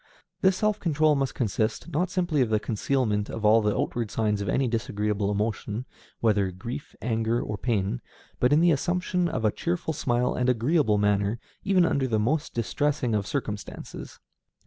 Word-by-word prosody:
This 190 Hz, 0 st, +4 dB
self 215 Hz, 0 st, +1 dB
control 155 Hz, -3 st, +3 dB
must 135 Hz, -2 st, -1 dB
consist, 110 Hz, -, -1 dB
not 170 Hz, +3 st, 0 dB
simply 175 Hz, -5 st, +1 dB
in 120 Hz, -, +2 dB
the 110 Hz, -1 st, +2 dB
concealment 110 Hz, -1 st, 0 dB
of 110 Hz, -1 st, -4 dB
all 110 Hz, +2 st, +6 dB
the 105 Hz, -1 st, +1 dB
outward 115 Hz, -3 st, -1 dB
signs 105 Hz, -2 st, 0 dB
of 100 Hz, -, -2 dB
any 130 Hz, +7 st, +2 dB
disagreeable 105 Hz, -3 st, -1 dB
emotion, 105 Hz, +2 st, -2 dB, 0.4 s
whether 105 Hz, -4 st, +3 dB
of 90 Hz, -1 st, -8 dB
grief, 120 Hz, +8 st, -7 dB
anger, 115 Hz, 0 st, 0 dB
or 105 Hz, -, -3 dB
pain, 100 Hz, -, -1 dB, 0.4 s
but 125 Hz, -, +3 dB
in 150 Hz, +2 st, +5 dB
the 175 Hz, 0 st, +5 dB
assumption 180 Hz, +3 st, 0 dB
of 135 Hz, -8 st, -2 dB
a 105 Hz, -, +4 dB
cheerful 170 Hz, +2 st, -2 dB
smile 125 Hz, -3 st, 0 dB
and 125 Hz, 0 st, +1 dB
agreeable 125 Hz, -1 st, +2 dB
manner 105 Hz, +1 st, +1 dB
under -, -, -32 dB, 0.7 s
even -, -, -3 dB
the 110 Hz, -, +2 dB
most 140 Hz, +9 st, 0 dB
distressing 125 Hz, +3 st, 0 dB
of 100 Hz, -2 st, 0 dB
circumstances. 105 Hz, -7 st, -5 dB
115 Hz, 175 wpm, -26 LUFS, 105-145 Hz, 0.7 s, all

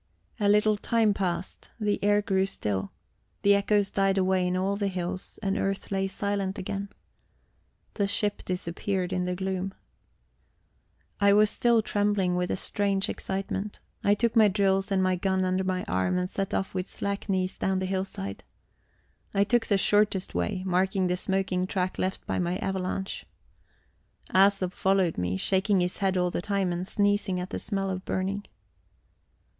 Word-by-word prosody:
A 205 Hz, -1 st, +3 dB
little 210 Hz, 0 st, +4 dB
time 220 Hz, 0 st, +2 dB
passed; 185 Hz, -2 st, -3 dB
the 210 Hz, -2 st, 0 dB
air 205 Hz, 0 st, +3 dB
grew 195 Hz, -2 st, +1 dB
still, 100 Hz, -, -2 dB, 0.5 s
the 200 Hz, -, +6 dB
echoes 200 Hz, 0 st, +2 dB
died 195 Hz, 0 st, +2 dB
away 185 Hz, -1 st, +2 dB
in 180 Hz, 0 st, 0 dB
all 195 Hz, +2 st, 0 dB
the 200 Hz, 0 st, -1 dB
hills, 185 Hz, 0 st, -4 dB
and 195 Hz, -1 st, 0 dB
earth 195 Hz, 0 st, -2 dB
lay 195 Hz, 0 st, +1 dB
silent 200 Hz, 0 st, -2 dB
again. 200 Hz, +2 st, -4 dB, 1.0 s
The 200 Hz, -2 st, 0 dB
ship 205 Hz, +1 st, 0 dB
disappeared 185 Hz, +1 st, -2 dB
in 180 Hz, -1 st, 0 dB
the 180 Hz, 0 st, -1 dB
gloom. 190 Hz, 0 st, -3 dB, 1.4 s
I 200 Hz, 0 st, +5 dB
was 210 Hz, 0 st, +5 dB
still 235 Hz, -2 st, +3 dB
trembling 205 Hz, -4 st, +1 dB
with 180 Hz, 0 st, 0 dB
a -, -, -1 dB
strange 200 Hz, 0 st, 0 dB
excitement. 195 Hz, +1 st, -4 dB, 0.2 s
I 205 Hz, -, +4 dB
took 235 Hz, +2 st, +1 dB
my 220 Hz, -2 st, +7 dB
drills 195 Hz, 0 st, +1 dB
and 190 Hz, -1 st, +2 dB
my 185 Hz, 0 st, +2 dB
gun 190 Hz, 0 st, +1 dB
under 185 Hz, +1 st, +1 dB
my 185 Hz, -1 st, -1 dB
arm 95 Hz, -, 0 dB
and 180 Hz, 0 st, 0 dB
set 195 Hz, +1 st, -3 dB
off 190 Hz, -, -1 dB
with 185 Hz, 0 st, -2 dB
slack 200 Hz, +1 st, -4 dB
knees 185 Hz, -1 st, 0 dB
down 190 Hz, 0 st, 0 dB
the 190 Hz, -, -1 dB
hillside. 185 Hz, -, -4 dB, 0.9 s
I 200 Hz, -, +5 dB
took 230 Hz, +2 st, +1 dB
the 200 Hz, -, +3 dB
shortest 205 Hz, -1 st, +2 dB
way, 90 Hz, -, -1 dB
marking 190 Hz, +1 st, +1 dB
the 180 Hz, 0 st, +1 dB
smoking 185 Hz, 0 st, 0 dB
track 185 Hz, -1 st, -2 dB
left 190 Hz, +1 st, -2 dB
by -, -, -1 dB
my 180 Hz, 0 st, 0 dB
avalanche. 190 Hz, 0 st, -3 dB, 1.0 s
Æsop 190 Hz, -1 st, +4 dB
followed 190 Hz, -, +1 dB
me, 90 Hz, +1 st, -1 dB
shaking 190 Hz, -, +2 dB
his 180 Hz, 0 st, -1 dB
head 190 Hz, -1 st, +1 dB
all 180 Hz, 0 st, +1 dB
the -, -, -2 dB
time 195 Hz, -1 st, 0 dB
and 175 Hz, +2 st, -3 dB
sneezing 205 Hz, -2 st, +1 dB
at 180 Hz, +1 st, -5 dB
the -, -, -3 dB
smell 195 Hz, -2 st, -2 dB
of 185 Hz, 0 st, -4 dB
burning. 195 Hz, +2 st, -2 dB
190 Hz, 170 wpm, -27 LUFS, 185-200 Hz, 1.4 s, my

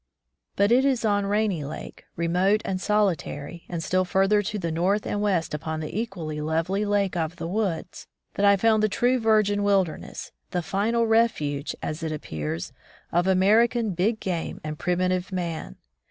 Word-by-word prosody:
But 200 Hz, +2 st, +3 dB
it 255 Hz, +2 st, +5 dB
is 260 Hz, -4 st, +1 dB
on 205 Hz, -2 st, +2 dB
Rainy 205 Hz, -6 st, 0 dB
Lake, 145 Hz, +3 st, -8 dB
remote 180 Hz, +5 st, +2 dB
and 185 Hz, -1 st, -2 dB
soli 210 Hz, -3 st, +3 dB
tary, 145 Hz, +3 st, -8 dB
and 170 Hz, -2 st, -3 dB
still 185 Hz, +3 st, +1 dB
further 195 Hz, +3 st, +3 dB
to 210 Hz, +1 st, -3 dB
the 170 Hz, -4 st, -2 dB
north 185 Hz, +6 st, +1 dB
and 205 Hz, -, -2 dB
west 185 Hz, -7 st, 0 dB
upon 155 Hz, +1 st, -3 dB
the 155 Hz, +1 st, -6 dB
equally 165 Hz, -9 st, -5 dB
lovely 165 Hz, +6 st, 0 dB
Lake 205 Hz, -2 st, +1 dB
of 165 Hz, 0 st, -2 dB
the 165 Hz, -2 st, -5 dB
Woods, 190 Hz, -3 st, -3 dB, 0.3 s
that 200 Hz, -, -2 dB
I 200 Hz, 0 st, +7 dB
foimd 220 Hz, +1 st, +3 dB
the 215 Hz, -, +2 dB
true 250 Hz, +5 st, +2 dB
virgin 215 Hz, -2 st, +3 dB
wilderness, 195 Hz, -5 st, -1 dB, 0.2 s
the 180 Hz, -1 st, -2 dB
final 225 Hz, +6 st, +1 dB
refuge, 220 Hz, -11 st, +1 dB
as 155 Hz, +2 st, -3 dB
it 160 Hz, -1 st, -2 dB
appears, 80 Hz, -, -4 dB, 0.4 s
of 175 Hz, +2 st, +2 dB
American 215 Hz, +4 st, +3 dB
big 200 Hz, +6 st, 0 dB
game 175 Hz, -3 st, -3 dB
and 155 Hz, 0 st, -5 dB
primitive 180 Hz, +1 st, 0 dB
man. 170 Hz, -, -4 dB
190 Hz, 170 wpm, -25 LUFS, 165-210 Hz, 0.4 s, I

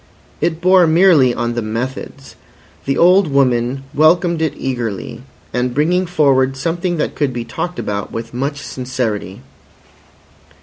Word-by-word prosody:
It 165 Hz, -1 st, -1 dB
bore 185 Hz, -1 st, +5 dB
merely 160 Hz, -6 st, +5 dB
on 120 Hz, 0 st, -2 dB
the 120 Hz, -, -2 dB
methods. 125 Hz, +5 st, -6 dB, 0.5 s
The 135 Hz, 0 st, 0 dB
old 180 Hz, +2 st, +5 dB
woman 130 Hz, -2 st, +1 dB
welcomed 165 Hz, +2 st, +3 dB
it 155 Hz, -2 st, -1 dB
eagerly 120 Hz, -6 st, -4 dB, 0.3 s
as 125 Hz, +1 st, 0 dB
bringing 165 Hz, +8 st, 0 dB
forward 135 Hz, -5 st, +2 dB
something 170 Hz, +4 st, -2 dB
that -, -, -2 dB
could 145 Hz, -3 st, -1 dB
be 120 Hz, -1 st, -5 dB
talked 175 Hz, +9 st, -5 dB
about 100 Hz, 0 st, -4 dB
with 115 Hz, +1 st, -6 dB
much 140 Hz, +3 st, -3 dB
sincerity. 125 Hz, -4 st, -4 dB
135 Hz, 135 wpm, -17 LUFS, 120-165 Hz, 0.5 s, bore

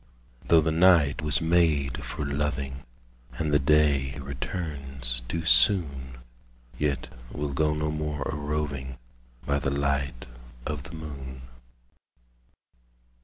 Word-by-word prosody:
Though 80 Hz, -1 st, +6 dB
the 80 Hz, +1 st, +1 dB
night 80 Hz, -3 st, +5 dB
was 75 Hz, +1 st, +1 dB
made 80 Hz, -5 st, +2 dB
for 75 Hz, -, -4 dB
loving, 70 Hz, -2 st, -2 dB, 0.5 s
And 80 Hz, -2 st, -2 dB
the 70 Hz, -, +5 dB
day 70 Hz, -1 st, +3 dB
returns 70 Hz, -3 st, -3 dB
too 85 Hz, -1 st, -2 dB
soon, 65 Hz, -1 st, +3 dB, 0.6 s
Yet 75 Hz, -2 st, -1 dB, 0.2 s
we'll 70 Hz, +1 st, -3 dB
go 75 Hz, +2 st, +1 dB
no 75 Hz, 0 st, -1 dB
more 75 Hz, -1 st, -3 dB
a -, -, -3 dB
roving 75 Hz, -3 st, -3 dB, 0.5 s
By 70 Hz, 0 st, +1 dB
the 65 Hz, -, -1 dB
light 70 Hz, -2 st, -1 dB, 0.4 s
of 75 Hz, -2 st, -3 dB
the -, -, -9 dB
moon. 70 Hz, -5 st, -8 dB
75 Hz, 120 wpm, -27 LUFS, 70-75 Hz, 0.6 s, Though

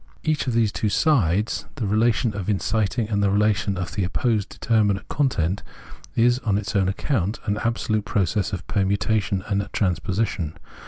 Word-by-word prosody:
Each 155 Hz, -3 st, 0 dB
of 125 Hz, -, 0 dB
these 115 Hz, -2 st, +2 dB
two 105 Hz, -, -1 dB
sides, 105 Hz, -, +1 dB
the 125 Hz, -7 st, -3 dB
relation 110 Hz, +2 st, +2 dB
of 100 Hz, -1 st, -3 dB
inciting 105 Hz, +2 st, 0 dB
and 100 Hz, -2 st, 0 dB
the 100 Hz, -, +3 dB
relation 100 Hz, -1 st, +1 dB
of 90 Hz, -1 st, -3 dB
the 100 Hz, -, -1 dB
opposed 105 Hz, +3 st, 0 dB
determinate 105 Hz, -4 st, +1 dB
content, 100 Hz, -, 0 dB, 0.5 s
is 120 Hz, +2 st, +3 dB
on 105 Hz, -6 st, 0 dB
its 105 Hz, 0 st, -4 dB
own 95 Hz, -2 st, +3 dB
account 105 Hz, -, -1 dB
an 105 Hz, -1 st, 0 dB
absolute 110 Hz, -2 st, 0 dB
process 100 Hz, -1 st, 0 dB
of 95 Hz, -, -5 dB
permutation 100 Hz, -1 st, 0 dB
and 100 Hz, -1 st, -1 dB
transposition. 90 Hz, -3 st, -1 dB
105 Hz, 160 wpm, -23 LUFS, 95-115 Hz, 0.5 s, the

